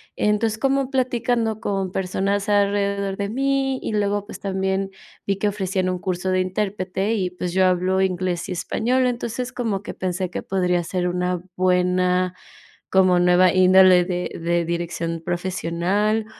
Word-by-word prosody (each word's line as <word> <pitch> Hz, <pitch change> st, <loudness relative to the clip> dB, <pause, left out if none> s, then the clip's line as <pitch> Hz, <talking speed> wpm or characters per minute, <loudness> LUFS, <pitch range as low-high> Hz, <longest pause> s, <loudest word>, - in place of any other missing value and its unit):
Entonces, 210 Hz, +1 st, +1 dB
como 270 Hz, 0 st, +1 dB
platicando 240 Hz, -4 st, 0 dB
con 195 Hz, -4 st, -2 dB
personas 195 Hz, +2 st, -1 dB
alrededor 200 Hz, -1 st, +1 dB
de 200 Hz, 0 st, -2 dB
mí, 270 Hz, +2 st, 0 dB
y -, -, -4 dB
luego, 205 Hz, -1 st, 0 dB
pues, -, -, -9 dB
también 190 Hz, 0 st, -1 dB, 0.3 s
vi 195 Hz, -1 st, 0 dB
que 205 Hz, +1 st, 0 dB
ofrecían 190 Hz, -2 st, -1 dB
un 185 Hz, -, -1 dB
curso 185 Hz, 0 st, -3 dB
de 185 Hz, 0 st, +2 dB
intérprete 190 Hz, +2 st, -1 dB
y, 185 Hz, -4 st, -1 dB
pues, 180 Hz, 0 st, -4 dB
yo 190 Hz, +1 st, +3 dB
hablo 185 Hz, +1 st, +2 dB
inglés 185 Hz, -2 st, -1 dB
y -, -, -6 dB
español. 250 Hz, +8 st, 0 dB
Entonces, 245 Hz, +1 st, -3 dB
como 225 Hz, -6 st, -2 dB
que 210 Hz, -, -8 dB
pensé 185 Hz, 0 st, -2 dB
que -, -, -5 dB
podría 180 Hz, -2 st, 0 dB
ser 180 Hz, +1 st, -2 dB
una 180 Hz, 0 st, -1 dB
buena, 180 Hz, 0 st, +1 dB, 0.5 s
como 185 Hz, -2 st, +4 dB
nueva 180 Hz, 0 st, +4 dB
índole 185 Hz, -1 st, +6 dB
de 180 Hz, 0 st, -3 dB
de 170 Hz, +1 st, 0 dB
dirección 170 Hz, -1 st, -3 dB
profesional, 185 Hz, +5 st, -1 dB
190 Hz, 155 wpm, -22 LUFS, 180-210 Hz, 0.5 s, índole